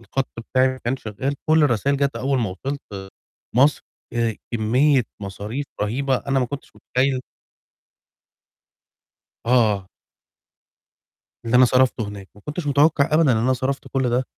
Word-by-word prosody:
الخط 135 +3 -2 0.2
بتاعي 130 0 +4
ما 130 0 -4
كانش 130 +2 -2
شغال، 130 +7 -2
كُلّ 160 0 +5
الرسايل 140 +2 +1
جات 140 -4 0
أول 135 +2 0
ما 110 -5 -1
وصِلت 135 +10 -5 0.7
مَصر، 140 +4 +4 0.3
آآ 115 -2 0 0.2
كمية 125 +5 +3 0.2
مصاريف 105 +8 -5 0.2
رهيبة 130 +5 0
أنا 135 +1 -1
ما 125 - 0
كنتش 140 +3 -7
متخيّل 130 0 0 2.3
آه. 110 -6 +2 1.6
اللي 115 +2 +1
أنا 130 - +8
صرَفته 125 -3 +2
هناك، 100 -2 -9
ما 105 - -17
كنتش 150 +1 -4
متوقع 145 0 +4
أبدًا 155 -4 +4
إن 110 - +2
أنا 125 +4 +2
صَرَفت 135 +2 -2
كُلّ 130 -2 0
ده 125 +2 +1
130 Hz, 140 wpm, -22 LUFS, 115-140 Hz, 2.3 s, أنا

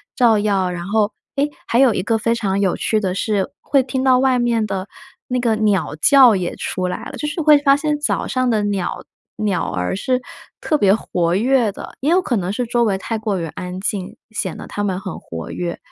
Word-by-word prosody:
照 230 -4 +4
耀， 200 -3 +1
然 175 0 -5
后 210 +1 +1 0.2
诶， 285 +1 +1 0.2
还 235 - +2
有 260 -4 +5
一 - - -1
个 225 +4 +1
非 230 +1 +1
常 200 -4 -1
有 190 -3 +1
趣 215 - +1
的 190 -3 -1
是， 200 0 -1
会 275 -2 +2
听 260 0 -2
到 260 -1 +5
外 255 -1 +3
面 235 -2 +1
的 195 -1 -4 0.4
那 250 0 -1
个 235 -3 +1
鸟 210 -6 +1
叫 260 -6 +7
也 180 -2 -2
出 185 0 -3
来 180 - -4
了， - - -7
就 300 - -3
是 300 +3 -3
会 300 -1 +6
发 280 -1 +4
现 295 0 -1
早 295 - 0
上 255 -1 0
的 215 -3 +1
鸟 200 -3 -2 0.3
鸟 200 -5 -1
儿 90 0 -2
是 255 +4 0 0.4
特 305 - +1
别 200 -8 +4
活 175 -5 -1
跃 240 +2 +2
的， - - -10
也 280 - +1
有 360 +3 +4
可 245 -10 -1
能 185 0 -2
是 245 +3 -1
周 240 +1 +1
围 200 -3 +1
太 225 +3 -3
过 215 -3 -2
于 165 - -3
安 180 +3 -6
静， 200 +1 -3
显 195 -5 -3
得 - - -8
它 205 - -4
们 190 -3 -1
很 190 -4 -6
活 80 -1 -8
跃。 175 -1 -4
215 Hz, 245 characters per minute, -19 LUFS, 190-255 Hz, 0.4 s, 叫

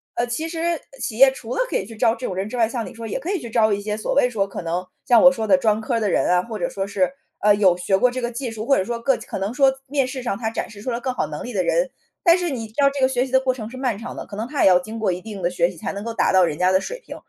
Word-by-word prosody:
呃， 240 - +1
其 310 +7 -3
实 335 0 -1 0.2
企 220 - -4
业 270 0 +8
除 250 -2 -7
了 - - +1
可 - - -3
以 190 - -3
去 225 - -11
招 225 +1 +2
这 255 - -6
种 185 - -3
人 195 +3 -3
之 250 - -5
外， 230 -2 +3
像 235 0 -3
你 - - -8
说 230 -1 -7
也 220 - -3
可 330 +8 -4
以 395 - 0
去 235 -5 -8
招 220 -2 +3
一 200 - +1
些 210 +1 -3
所 215 - -2
谓 280 - +5
说 200 -5 -1
可 190 - -7
能 170 +2 -2 0.2
像 240 -2 +6
我 270 - +9
说 225 -5 -3
的 - - +6
专 220 -5 +2
科 230 +1 -1
的 210 -3 0
人 - - +2
啊， 180 0 +3
或 225 0 -6
者 260 - -1
说 195 -6 -3
是， 195 +2 0 0.3
呃， 210 0 +5
有 190 -4 +4
学 180 +2 +1
过 250 +4 +4
这 255 - -4
个 240 - -2
技 245 +1 -4
术， 220 -1 -6
或 275 - +4
者 - - +1
说 235 +3 -4
个 270 +3 +2
可 - - -6
能 195 +4 -2
说 270 0 +4 0.2
面 275 -1 +1
试 255 -1 -6
上 235 - -1
他 220 -2 -2
展 - - -4
示 205 -2 -12
出 255 - -4
了 235 -1 -2
更 255 +1 -2
好 - - -1
能 - - -6
力 245 - -6
的 190 -3 +1
人， - - +1 0.3
但 340 -2 +6
是 355 -2 -1
你 240 -5 -4
知 215 - -21
道 280 - +6
这 275 0 -5
个 260 - +4
学 260 0 0
习 - - -12
的 260 - +5
过 260 -1 0
程 225 -4 -7
是 255 - -9
漫 255 -4 -1
长 240 - -7
的， - - -6
可 200 - -10
能 220 +3 -4
他 290 - 0
也 - - +7
要 180 -1 +6
经 215 +5 -7
过 215 -4 +1
一 180 +1 -4
定 210 -1 -8
的 175 - +1
学 175 -1 +2
习 180 - -11
才 - - -4
能 200 - -6
够 230 - -4
达 - - +2
到 190 -1 +6
人 150 -4 0
家 180 +2 +3
的 190 - +3
水 - - -6
平， - - -8
230 Hz, 385 characters per minute, -22 LUFS, 200-260 Hz, 0.3 s, 我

